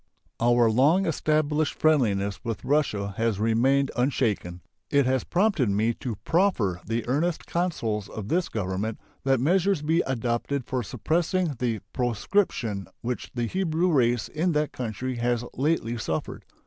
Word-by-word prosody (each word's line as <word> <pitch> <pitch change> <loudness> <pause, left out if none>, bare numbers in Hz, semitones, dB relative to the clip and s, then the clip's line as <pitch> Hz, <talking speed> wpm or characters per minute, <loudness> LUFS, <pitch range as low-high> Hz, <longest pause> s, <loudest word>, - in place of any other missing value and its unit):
Our 120 0 +4
long 150 - +4
established 155 -1 +1
friendliness 100 -11 +2
with 115 -3 -4
Russia 110 -9 0
has 115 -3 0
remained 130 +5 +2
unshaken. 110 -9 0 0.3
It 140 -1 +3
has 130 0 +1
prompted 180 - +1
me 110 +4 +1
to 120 -4 -3
proffer 125 - +1
the 115 +2 -3
earnest 155 +7 0
counsels 115 - -2
of 105 -3 -6
this 175 +8 0
Government 105 +1 -3 0.3
that 135 -2 +3
measures 180 +4 +2
be 160 +3 +2
adopted 125 +1 -1
for 130 -1 -2
suppressing 170 - 0
the 115 -4 -1
proscription 120 - 0
which 125 +1 -4
the 120 -1 0
Hebrew 175 +3 0
race 120 -5 +2
in 165 +3 0
that 150 0 0
country 125 +1 -4
has 120 0 0
lately 130 -5 0
suffered. 80 -7 -4
125 Hz, 140 wpm, -26 LUFS, 115-155 Hz, 0.3 s, Our